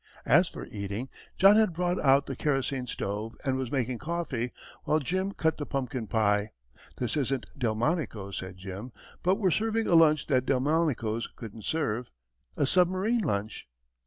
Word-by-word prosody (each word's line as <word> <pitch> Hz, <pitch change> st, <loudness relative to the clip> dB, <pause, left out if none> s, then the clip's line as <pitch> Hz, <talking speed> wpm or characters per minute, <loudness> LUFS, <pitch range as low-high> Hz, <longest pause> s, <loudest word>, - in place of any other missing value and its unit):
As -, -, +5 dB
for -, -, -7 dB
eating, 100 Hz, +5 st, -5 dB, 0.3 s
John 195 Hz, +3 st, +7 dB
had 215 Hz, -5 st, +3 dB
brought 175 Hz, +2 st, 0 dB
out 140 Hz, 0 st, +4 dB
the 135 Hz, -, -5 dB
kerosene 135 Hz, -2 st, -1 dB
stove 105 Hz, +1 st, -4 dB
and 135 Hz, -1 st, +1 dB
was 130 Hz, -2 st, -3 dB
making 125 Hz, -3 st, -1 dB
coffee, 150 Hz, -8 st, -2 dB, 0.3 s
while 155 Hz, -, +3 dB
Jim 185 Hz, +6 st, -1 dB
cut 160 Hz, -4 st, 0 dB
the 145 Hz, -, -4 dB
pumpkin 130 Hz, -4 st, -3 dB
pie. 105 Hz, -1 st, +1 dB, 0.4 s
"This 125 Hz, +2 st, -1 dB
isn't 135 Hz, -3 st, 0 dB
Delmonico's," 115 Hz, -, -1 dB
said 95 Hz, 0 st, -6 dB
Jim, 95 Hz, +6 st, -7 dB, 0.3 s
"but 185 Hz, +2 st, +3 dB
we're 195 Hz, -4 st, +1 dB
serving 225 Hz, +4 st, +1 dB
a -, -, +1 dB
lunch 155 Hz, -3 st, +5 dB
that 130 Hz, -3 st, +1 dB
Delmonico's 130 Hz, -5 st, +1 dB
couldn't 110 Hz, -2 st, -10 dB
serve 125 Hz, -7 st, -1 dB, 0.5 s
a 145 Hz, -, +3 dB
submarine 185 Hz, -, +2 dB
lunch." 105 Hz, -, -2 dB
135 Hz, 160 wpm, -28 LUFS, 115-165 Hz, 0.5 s, John